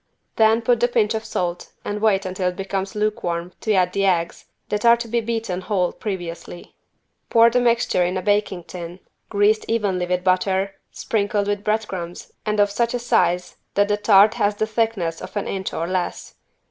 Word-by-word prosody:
Then 225 +1 +4
put 240 0 +3
the 240 - +3
pinch 230 -3 +1
of 220 0 -3
salt 180 -5 -3 0.2
and 205 0 -3
wait 200 -3 +2
until 185 0 -2
it 180 - -7
becomes 195 +2 -4
lukewarm 180 -5 -2
to 220 - +1
add 180 -1 +2
the 195 0 +1
eggs 170 -3 0 0.2
that 210 0 -1
are 235 0 +6
to 235 0 -5
be 235 +1 0
beaten 225 -5 -3
whole 185 -3 0
previously. 175 -3 -6 0.6
Pour 230 0 +6
the 250 - +3
mixture 235 -6 +2
in 180 +2 -1
a 185 - -3
baking 205 -3 0
tin 175 +1 -8 0.3
greased 210 +1 +2
evenly 200 -6 0
with 180 0 -1
butter, 190 +1 +1 0.2
sprinkled 205 -1 -1
with 205 0 -1
bread 215 0 0
crumbs 175 -2 -7 0.2
and 210 0 0
of 205 0 +4
such 235 +3 0
a - - +1
size 180 -7 +1 0.2
that 205 +1 +3
the 205 - +2
tart 205 0 +6
has 205 0 +1
the 215 - 0
thickness 215 -7 -1
of - - -7
an 205 - -2
inch 190 -1 -3
or 165 - -2
less. 185 0 -3
205 Hz, 195 wpm, -22 LUFS, 180-220 Hz, 0.6 s, are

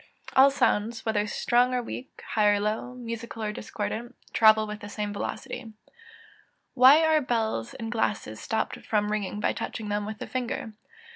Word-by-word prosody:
_ - - -11
All 265 +1 +8
sounds, 230 -4 0
whether 210 -2 +1
strong 245 +4 +2
or 245 - 0
weak, 250 +2 -8
high 210 -2 +3
or 205 0 +4
low, 215 +4 -2
musical 230 -2 -6
or 210 - -1
discordant, 220 +3 -5 0.2
travel 220 -1 +6
with 210 0 -6
the 205 -1 -9
same 205 0 -3
velocity. 230 +3 -5 1.0
723. 255 - -1
_Why 295 +5 +9
are 310 -1 +4
bells 225 - -1
and 225 -1 -5
glasses 205 - -1
stopped 220 0 -2
from 210 -1 0
ringing 210 -1 -2
by - - +1
touching 215 -2 -5
them 205 0 -1
with 215 0 -5
the - - -6
finger? 240 -3 -4
220 Hz, 180 wpm, -27 LUFS, 210-245 Hz, 1.0 s, Why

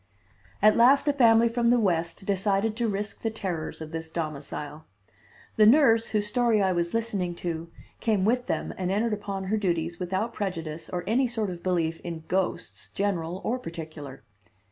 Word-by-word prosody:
At 215 0 +7
last 265 +5 +5
a 290 - +4
family 230 -4 +5
from 235 0 +1
the 245 0 +4
West 170 -3 -1
decided 200 +2 +1
to 235 0 0
risk 205 0 -3
the 225 - 0
terrors 185 -8 -4
of 155 -1 -7
this 160 0 -5
domicile. 150 -1 -5 0.7
The 215 -1 +7
nurse, 230 -3 +5
whose 210 -1 0
story 235 0 +2
I 190 -2 +2
was 170 +2 -1
listening 200 -6 -1
to, 170 -1 -4 0.3
came 210 -5 +1
with 245 +3 +1
them - - -2
and 180 -1 -1
entered 215 +3 +1
upon 200 -2 -4
her 205 +3 0
duties 170 -4 -1
without 190 +5 -2
prejudice 165 -5 -4
or 175 -1 -3
any 250 +5 +2
sort 220 -5 -2
of 175 -1 -8
belief 165 -3 0
in 165 -2 -6
ghosts, 190 0 -2
general 185 -3 -2
or 250 +3 -1
particular. 155 - -8
195 Hz, 175 wpm, -27 LUFS, 170-225 Hz, 0.7 s, At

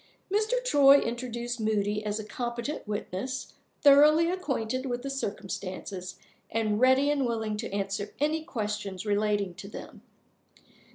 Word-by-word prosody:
Mr. 430 +3 +1
Troy 285 - +7
introduced 240 0 -3
Moody 210 -1 0
as 210 0 -2
a - - -4
competent 240 +4 -4
witness, 210 +5 -4 0.3
thoroughly 300 +4 +7
acquainted 265 -8 -2
with 245 0 -3
the 275 - -3
circumstances, 190 -6 -5 0.3
and 215 -1 0
ready 260 +3 +5
and 285 -2 +1
willing 220 -3 -1
to 225 0 -5
answer 200 0 -2
any 310 +2 +1
questions 210 - -4
relating 205 -2 +1
to 195 - -10
them. 205 - -10
230 Hz, 130 wpm, -28 LUFS, 205-275 Hz, 0.3 s, Troy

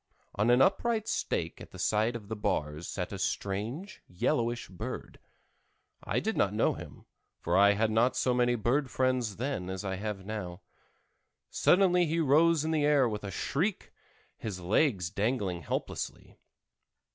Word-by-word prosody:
On 105 +4 +1
an 125 +2 +6
upright 220 - +1
stake - - -2
at - - -10
the - - -12
side 110 +3 +1
of 110 -3 -7
the 110 - -4
bars 75 -5 -2
sat 90 -2 -4
a 100 - -5
strange, 110 - -3
yellowish 120 +6 -1
bird. 90 - -7 0.8
I - - 0
did - - -2
not - - +1
know - - +2
him, - - -11 0.3
for 85 - -1
I 100 +1 +6
had 110 +2 +1
not 115 +4 +3
so 125 - +1
many 120 0 +2
bird 125 +5 0
friends 130 -5 0
then 120 -6 -3
as 95 +2 -5
I 95 -1 -2
have 100 -1 -5
now. 95 -5 -5 0.9
Suddenly 180 -2 +4
he 165 +2 0
rose 155 +1 +4
in 160 - 0
the 155 -2 +1
air 145 -3 +4
with 105 -2 -4
a 100 - -4
shriek, 160 - -2 0.5
his 100 -5 -5
legs 90 - +1
dangling 100 -5 -1
helplessly. - - -5
115 Hz, 160 wpm, -30 LUFS, 100-140 Hz, 0.9 s, an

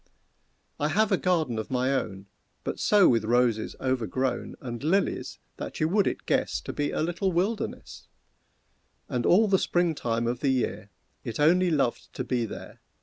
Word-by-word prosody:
I 150 - +1
have 215 +6 +2
a - - +5
garden 160 -12 0
of 110 - -5
my 130 +1 +1
own, 100 -7 -3 0.4
But - - -4
so 205 -3 +5
with 115 -3 +3
roses 115 -1 +1
overgrown, 130 0 -1
And 120 -1 -6
lilies, 190 +6 0 0.2
that - - -6
you 155 - +2
would 200 +2 +3
it - - -3
guess - - 0
To - - -6
be 145 0 -1
a - - -1
little 175 +3 -1
wilderness; 195 +6 -3 1.0
And 120 -2 -1
all 210 +5 +5
the 190 -2 +3
spring 175 -2 +1
time 115 -5 -1
of 120 +1 -1
the 140 - +1
year 125 -5 -1 0.3
It 115 0 -5
only 175 +5 +4
loved 140 -7 0
to 130 - -3
be 125 -2 -1
there. - - -9
135 Hz, 175 wpm, -27 LUFS, 120-175 Hz, 1.0 s, a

